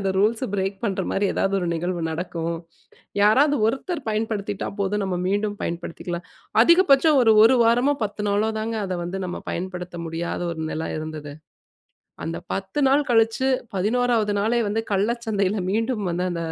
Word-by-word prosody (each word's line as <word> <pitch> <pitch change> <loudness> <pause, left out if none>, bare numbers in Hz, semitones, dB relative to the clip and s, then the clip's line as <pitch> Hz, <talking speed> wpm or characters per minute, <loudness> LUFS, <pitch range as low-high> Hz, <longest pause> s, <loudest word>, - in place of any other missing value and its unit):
அந்த 195 -1 0
rules 220 +5 +2
break 195 0 -1
பண்றமாரி 195 -1 -1
ஏதாவது 195 - +1
ஒரு 175 - -2
நிகழ்வு 175 +1 -2
நடக்கும். 170 0 -3 0.7
யாராவது 280 +8 +5
ஒருத்தர் 285 +8 -2
பயன்படுத்திட்டா 215 -2 -2
போதும். 200 +1 0
நம்ம 190 -2 -2
மீண்டும் 205 +1 0
பயன்படுத்திக்கலாம். 175 +1 -5 0.4
அதிகபட்சம் 310 -1 +5
ஒரு, 225 -2 +6
1 250 +3 +6
வாரமோ! 245 +5 +3
10 210 0 -5
நாளோ! 210 +2 +1
தாங்க 225 +1 -3
அத 185 - -3
வந்து 180 +3 -4
நம்ம 180 - -5
பயன்படுத்த 180 0 -5
முடியாத 165 +1 -3
ஒரு 160 - -7
நெல 160 - -3
இருந்தது. 155 -2 -6 0.9
அந்த 165 - -3 0.2
10 195 +8 -3
நாள் 285 +2 +3
கழிச்சு, 225 +2 +3 0.3
11வது 220 +1 +1
நாளே 225 +4 +1
வந்து 220 +2 0
கள்ள 200 +2 +2 0.2
சந்தையில 205 -2 0
மீண்டும் 225 0 -1
வந்து 180 +2 -1
அந்த, 170 -1 -3
205 Hz, 155 wpm, -23 LUFS, 180-230 Hz, 0.9 s, ஒரு